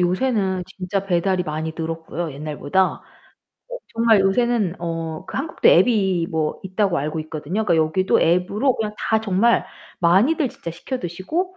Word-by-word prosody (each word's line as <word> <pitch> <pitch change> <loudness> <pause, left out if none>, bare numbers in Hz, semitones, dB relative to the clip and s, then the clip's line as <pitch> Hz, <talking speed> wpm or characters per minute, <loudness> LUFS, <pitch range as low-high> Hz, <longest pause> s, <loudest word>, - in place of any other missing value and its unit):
요새는 190 -1 0
진짜 195 +1 -4
배달이 180 0 +1
많이 155 +1 -3
늘었고요, 165 0 -4
옛날보다. 150 +4 -2 0.9
어 - - -5
정말 225 -2 +4
요새는 200 -1 +1
어 165 0 -4
그 - - -7
한국도 295 +5 +1
앱이 190 -4 +4
뭐 160 -1 -1
있다고 190 -1 0
알고 155 +3 -2
있거든요. 155 +6 -3
그러니까 175 -5 +2
여기도 160 +4 +2
앱으로 190 +10 +2
그냥 210 -1 -3
다 220 0 +1
정말 220 +3 +2 0.4
많이들 225 - +3
진짜 170 - -8
시켜 175 +10 -5
드시고, 280 - -3
185 Hz, 345 characters per minute, -21 LUFS, 165-220 Hz, 0.9 s, 정말